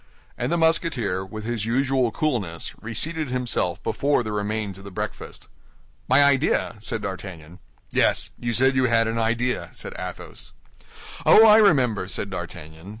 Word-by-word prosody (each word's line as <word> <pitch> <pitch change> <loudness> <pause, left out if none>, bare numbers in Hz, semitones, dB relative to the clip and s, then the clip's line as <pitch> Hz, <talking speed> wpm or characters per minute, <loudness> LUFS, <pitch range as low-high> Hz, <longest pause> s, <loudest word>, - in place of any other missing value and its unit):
And - - -3
the 170 - +2
Musketeer, 150 - +1
with 110 +3 -8
his 115 -2 -2
usual 130 0 +1
coolness, 105 - -2
reseated 150 +7 -2
himself 125 -8 -1
before 140 -3 +1
the 110 - -5
remains 105 -1 -3
of - - -13
the 100 - -9
breakfast. 95 - -7 0.6
"My 130 +3 +6
idea?" 140 -4 +2
said 110 0 -4
D'Artagnan. 90 -4 -7 0.3
"Yes; - - +1
you 120 - -2
said 130 +3 +3
you 130 0 +3
had 115 -2 +2
an 115 +1 -2
idea," 120 +2 -1
said - - -7
Athos. - - -8 0.7
"Oh, 220 - +8
I 215 0 +8
remember," 125 - +3
said 100 +1 -3
D'Artagnan. 85 -1 -8
115 Hz, 150 wpm, -23 LUFS, 100-135 Hz, 0.7 s, Oh